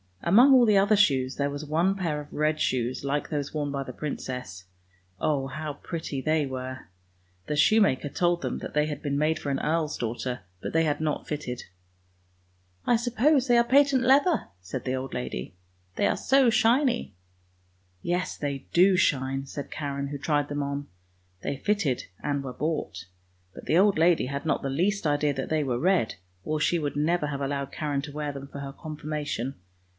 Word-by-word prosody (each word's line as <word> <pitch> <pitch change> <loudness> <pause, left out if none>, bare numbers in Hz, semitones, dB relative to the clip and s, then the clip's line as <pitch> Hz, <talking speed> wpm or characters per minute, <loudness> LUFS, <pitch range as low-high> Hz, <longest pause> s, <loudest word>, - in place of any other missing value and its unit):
Among 240 +10 +7
all 250 -2 +7
the 210 -3 +4
other 200 +2 +4
shoes 135 -10 +3
there 140 0 0
was 145 +2 -5
one 170 +6 +1
pair 165 -6 -2
of 145 - -13
red 155 +1 +1
shoes 125 0 -1
like 140 +1 -1
those 145 -2 -3
worn 145 -2 -1
by 140 -1 -2
the 125 - -8
princess; 125 -11 -5 0.5
oh, 140 -3 0
how 150 +2 -5
pretty 150 -2 -5
they 155 +1 +1
were. 130 -3 -6 0.6
The 150 - -1
shoemaker 175 -4 +3
told 175 +4 +1
them - - -3
that - - -7
they 150 0 +3
had 150 -1 -5
been 140 -2 -1
made 155 +2 +2
for 145 - -4
an 135 - 0
earl's 155 0 0
daughter, 120 +1 -3 0.2
but - - -5
they 165 0 +3
had 150 0 0
not 155 -2 -2
fitted. 135 -5 -4 0.6
" 90 0 -39 0.3
I 240 - +4
suppose 250 +4 +2
they 240 -1 +5
are 235 - +6
patent 270 +1 +4
leather," 280 +7 +4
said 95 +8 -6
the 130 0 0
old 130 0 -5
lady, 95 - -5 0.2
" 90 0 -39
they - - +3
are - - +1
so 270 -2 +4
shiny." 245 +3 +2 0.5
" 90 0 -39
Yes, 180 +1 -1
they 140 -2 -4
do 185 +2 +6
shine," 135 -4 +1
said 140 +1 -7
Karen, 140 -2 -3
who 145 +1 -5
tried 145 0 0
them 145 0 -2
on. 140 0 -4 0.5
They 140 - -3
fitted 170 -7 0 0.2
and 145 -1 -1
were 130 -2 -5
bought; 140 - -3 0.5
but - - -11
the 160 - +2
old 200 0 +4
lady 165 -4 +4
had 140 +3 -4
not 155 - +1
the 135 - -2
least 185 +8 0
idea 145 -1 +2
that 135 -1 -4
they 155 -1 +1
were 125 -3 -1
red, 180 -6 +2 0.3
or 155 0 -1
she 170 +3 +2
would 145 -2 -3
never 150 +1 +1
have 140 -1 -4
allowed 140 0 -2
Karen 145 -2 -2
to 145 - -7
wear 150 0 -3
them 140 0 -8
for 140 - -9
her 140 -1 -6
Confirmation. 150 -4 -4
145 Hz, 200 wpm, -27 LUFS, 135-170 Hz, 0.6 s, Among